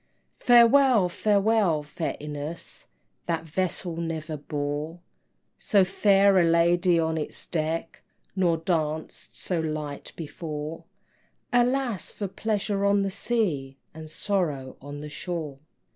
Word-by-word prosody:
Farewell, 240 -4 +6
farewell, 200 -4 +2
fair 150 +2 -4
Ines, 150 +2 -6 0.4
That 165 -1 -1
vessel 170 +1 -3
never 160 -2 -3
bore 145 +3 -4 0.6
So 200 -4 +3
fair 195 0 +4
a - - +5
lady 170 +1 +3
on 160 0 0
its 150 - -6
deck, 165 0 -3 0.3
Nor 175 -4 +2
danced 160 -2 -3
so 180 -3 -2
light 155 -2 -4
before, 155 -1 -6 0.7
Alas, 245 -3 +1
for 205 - -4
pleasure 200 0 -1
on 200 0 +3
the 195 - -1
sea, 160 - -1 0.2
And 155 0 -9
sorrow 155 -7 -2
on 145 +1 -8
the 150 - -6
shore! 155 -5 -5
170 Hz, 115 wpm, -26 LUFS, 155-195 Hz, 0.7 s, Farewell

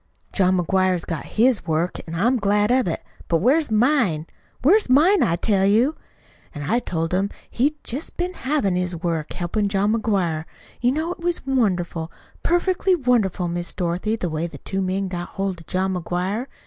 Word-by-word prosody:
John 185 -1 +3
McGuire's 185 0 +1
got 165 -4 -4
his 240 +1 +2
work, 165 +2 0
an' 165 - -5
I'm 240 +9 +2
glad 210 0 +2
of 255 -5 +3
it. 165 - -3 0.2
But 165 - +2
where's 275 - +3
mine? 220 - +2 0.4
Where's 390 - +4
mine, 330 +10 +5
I 165 - +3
tell 195 +2 +1
you?' 230 +10 +3 0.6
"An' 145 - -5
I 235 - +2
told 165 -6 -3
him 195 +2 +1 0.2
he'd 285 +5 +1
jest 270 +7 -6
been 360 +1 -1
havin' 260 - 0
his 180 -1 -1
work, 165 -2 -2
helpin' 200 +4 -1
John 200 +2 +1
McGuire. 190 -8 0 0.4
You 245 +1 +3
know 315 +5 -1
it - - -6
was 345 -2 -2
wonderful, 180 -10 0 0.3
perfectly 365 +2 +2
wonderful, 235 - +1
Miss 175 0 -3
Dorothy, 180 +4 -1
the 185 - -3
way 160 +1 -2
them - - -11
two 195 0 -2
men 190 +1 -1
got 175 -1 -5
hold 195 -2 -3
of 165 - -15
John 190 +1 0
McGuire. 180 +7 -2
195 Hz, 180 wpm, -22 LUFS, 175-250 Hz, 0.6 s, mine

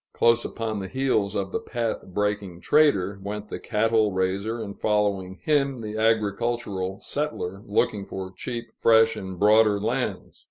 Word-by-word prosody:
Close 115 0 +3
upon 110 -2 -3
the 95 - -5
heels 110 -5 0
of 95 -1 -2
the - - -1
path 115 -2 -3
breaking 100 -2 -2
trader, 100 -7 +3
went 105 +1 -5
the - - -5
cattle 110 -1 +2
raiser, 95 +5 -1
and, 100 -3 -6
following 100 -3 0
him, 140 -4 +1
the 110 -1 -5
agricultural 110 -3 0
settler 100 -11 -3
looking 100 0 +1
for 95 -1 -7
cheap, 120 -2 -6
fresh, 115 0 +4
and 95 -3 -6
broader 105 0 +5
lands. 120 +5 -3
105 Hz, 150 wpm, -25 LUFS, 100-115 Hz, -, broader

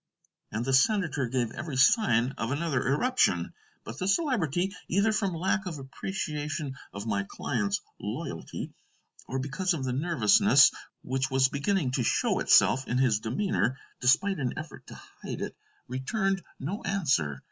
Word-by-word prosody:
And 110 +3 -2
the 135 - 0
senator 155 - +2
gave 120 -2 -1
every 150 -1 -5
sign 130 - +4
of 115 - -1
another 140 -4 -1
eruption. 140 - +1 0.3
But 115 +5 -8
the 185 - -1
Celebrity, 195 - +1
either 200 +5 +2
from 200 -5 0
lack 190 +4 0
of 165 -4 -5
appreciation 150 0 -4 0.2
of 100 +1 -7
my 100 -3 0
client's 105 -6 -1 0.2
loyalty, - - -5 0.5
or 130 - -3
because 150 +7 -1
of 140 - -4
the 130 -1 -1
nervousness 135 - +5 0.3
which 130 +1 -1
was 130 -1 +3
beginning 145 0 0
to 125 -1 0
show - - +1
itself 135 0 +4
in 125 - 0
his 125 -5 +3
demeanor, 125 - -1 0.2
despite 160 +9 +3
an 130 -3 -2
effort 155 -1 -8
to - - -10 0.3
hide - - -5
it, - - -4 0.3
returned 190 - -1 0.2
no 180 +10 -4
answer. 130 - 0
140 Hz, 150 wpm, -28 LUFS, 125-185 Hz, 0.5 s, nervousness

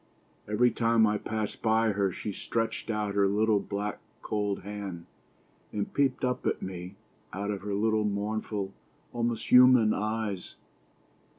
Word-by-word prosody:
Every 115 +4 +3
time 115 -1 +3
I 105 -1 +1
passed 110 -1 -4
by 110 0 +3
her 100 -1 +1
she 105 - -5
stretched 115 +3 -2
out 105 -2 -1
her 100 -1 +3
little, 105 +1 +3
black, 100 +1 -4 0.2
cold 105 -2 -2
hand, 100 -4 -6 0.7
and 105 -1 -3
peeped 135 -2 +1
up 125 0 -1
at - - 0
me 90 0 -6 0.4
out 100 +2 -2
of 100 - -4
her 100 0 -3
little 110 +1 +2
mournful, 105 -1 -2 0.4
almost 120 -1 -2
human 125 -3 +7
eyes. 105 -3 -3
105 Hz, 140 wpm, -29 LUFS, 100-110 Hz, 0.7 s, human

